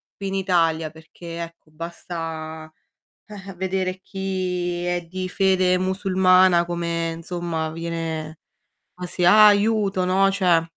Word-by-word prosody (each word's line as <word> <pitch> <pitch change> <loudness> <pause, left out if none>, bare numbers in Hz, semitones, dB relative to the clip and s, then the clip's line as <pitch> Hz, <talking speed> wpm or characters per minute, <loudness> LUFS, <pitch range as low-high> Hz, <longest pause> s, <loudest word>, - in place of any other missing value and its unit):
qui 200 - -5
in 195 - -3
Italia, 165 -4 +1
perché, 165 +2 -10
ecco, 165 -1 -12
basta 160 -1 -7 0.6
eh-eh, 195 -2 -10
vedere 185 0 -2
chi 180 -3 -3
è 175 0 -1
di 185 +2 -5
fede 185 -1 +2
musulmana 185 -1 +3
come, 170 -1 -2
insomma, 165 -1 -4
viene 165 -1 -4 0.6
"ma 180 - -7
se 180 0 -1
ha 210 +4 +8
aiuto", 205 -2 +2
no, 195 +2 +3
cioè 180 -4 +3
180 Hz, 125 wpm, -23 LUFS, 165-190 Hz, 0.6 s, ha